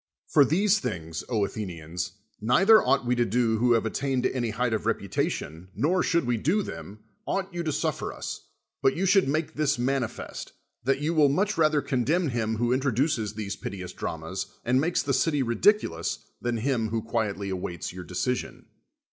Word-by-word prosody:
For 145 - +5
these 195 - +3
things, 80 - -4
Athenians, 90 -6 -3 0.3
neither 195 - +6
ought - - +2
we 120 - +2
to 120 - +4
do 115 0 +1
who 120 +1 +4
have 115 -1 +2
attained 130 +2 -1
to - - +1
any 120 -3 0
height 120 +2 0
of 110 - -1
reputation, 80 +4 -2
nor, 180 +5 +2
should 170 -4 +1
we 120 -1 +1
do 180 - +1
them, 95 - -8 0.2
ought 195 -1 -2
you 175 - -2
to 160 -2 -1
suffer - - -1
us; - - -7 0.3
but 135 - +3
you 190 - +1
should 195 -2 +4
make 155 +3 -1
this 150 -3 +1
manifest, 125 -1 -3 0.3
that 135 +2 +1
you 155 +3 0
will 150 -3 +5
much 200 +9 +1
rather 155 -2 +3
condemn 145 +6 +1
him 110 -2 -1
who 120 +2 +1
introduces 130 -4 0
these 105 -2 -4
piteous 90 -2 -6
dramas, 90 +4 -4 0.2
and 130 +2 +3
makes 175 +4 +1
the 140 - 0
city 145 +1 +2
ridiculous, 115 - +1 0.2
than 120 -1 -1
him 115 -2 0
who 110 0 -2
quietly 105 -4 -2
awaits 90 -2 -4
your 90 0 -7
decision. 90 +9 -3
120 Hz, 180 wpm, -27 LUFS, 105-150 Hz, 0.3 s, neither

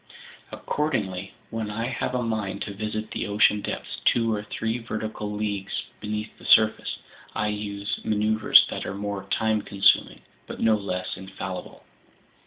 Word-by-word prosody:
Accordingly, 100 -11 -2 0.2
when 110 -2 -3
I 110 +2 -2
have 125 0 -2
a 125 - 0
mind 110 -4 -2
to 100 - -5
visit 110 +1 -4
the - - -2
ocean 105 0 +4
depths - - -5
two 115 -2 +3
or 105 - -1
three 110 +3 -2
vertical 110 -2 -4
leagues 105 -2 -2 0.2
beneath 105 0 -4
the - - -13
surface, 110 0 +5 0.4
I 105 - +1
use 105 -1 -3
maneuvers 110 0 +5
that - - -3
are 95 - -4
more 100 0 -4
time 110 -1 +2
consuming 100 -2 +3 0.3
but - - -7
no 110 - +4
less 90 -4 -3
infallible." 95 -1 -7
105 Hz, 150 wpm, -26 LUFS, 100-110 Hz, 0.4 s, surface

